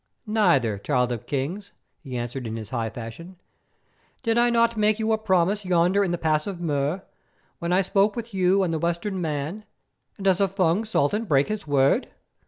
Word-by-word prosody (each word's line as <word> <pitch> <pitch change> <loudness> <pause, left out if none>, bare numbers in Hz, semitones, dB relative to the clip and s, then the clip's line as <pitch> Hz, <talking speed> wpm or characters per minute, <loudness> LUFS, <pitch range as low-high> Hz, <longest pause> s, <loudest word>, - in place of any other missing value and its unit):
"Neither, 170 - +2
Child 125 +2 0
of 120 -3 -5
Kings," 170 +9 -3 0.3
he 130 -5 -6
answered 120 +1 -4
in 110 - -4
his 110 -2 -7
high 115 -3 -1
fashion. 120 - -9 0.9
"Did 230 -2 +1
I 240 +1 +4
not 235 0 +3
make 215 0 +2
you 220 0 0
a 220 - +3
promise 195 0 +1
yonder 180 +2 +3
in 190 - -1
the 175 - -1
Pass 155 0 0
of 190 -4 -5
Mur, 155 +2 -1 0.6
when 170 +1 -2
I 185 +2 +3
spoke 200 +2 +2
with 235 -2 -6
you 190 +1 +3
and 170 -3 -1
the 160 - -1
Western 170 +4 -2
men, 155 +6 -3 0.5
and 195 - -7
does 190 0 +3
a 195 - +4
Fung 190 +2 +1
Sultan 210 +1 0
break 140 -7 +2
his 215 -6 -4
word? 140 -1 +3
175 Hz, 190 wpm, -25 LUFS, 140-205 Hz, 0.9 s, I